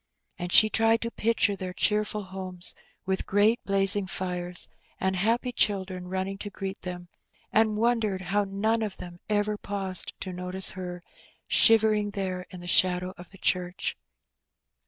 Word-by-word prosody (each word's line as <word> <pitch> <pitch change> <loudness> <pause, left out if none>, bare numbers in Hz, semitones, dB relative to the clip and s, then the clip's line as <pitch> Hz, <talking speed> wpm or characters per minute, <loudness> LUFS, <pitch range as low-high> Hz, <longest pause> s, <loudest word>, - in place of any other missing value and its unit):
And 175 0 -5
she 215 - +8
tried 225 +1 +1
to 230 - -4
picture 230 -2 0
their 185 -1 -7
cheerful 210 +1 0
homes, 185 -1 -1 0.3
with 190 0 -2
great 210 +4 +2
blazing 195 0 +1
fires, 180 -1 +1 0.3
and 190 0 -1
happy 230 +6 0
children 190 -5 0
running 190 +1 -4
to 205 - -5
greet 195 -1 -7
them, 180 -1 -7 0.5
and 215 -1 +2
wondered 220 -4 0
how 200 +3 -1
none 215 +4 -1
of 210 -3 -4
them 175 -1 -10
ever 210 0 -1
paused 195 -2 +3
to 185 - -5
notice 180 +1 +4
her, 180 -1 -8 0.4
shivering 215 -2 +4
there 185 -2 -4
in 180 - -11
the 175 - -10
shadow 180 +1 +3
of 175 -1 -13
the 195 - -11
church. 180 0 -2
195 Hz, 155 wpm, -26 LUFS, 180-210 Hz, 0.5 s, she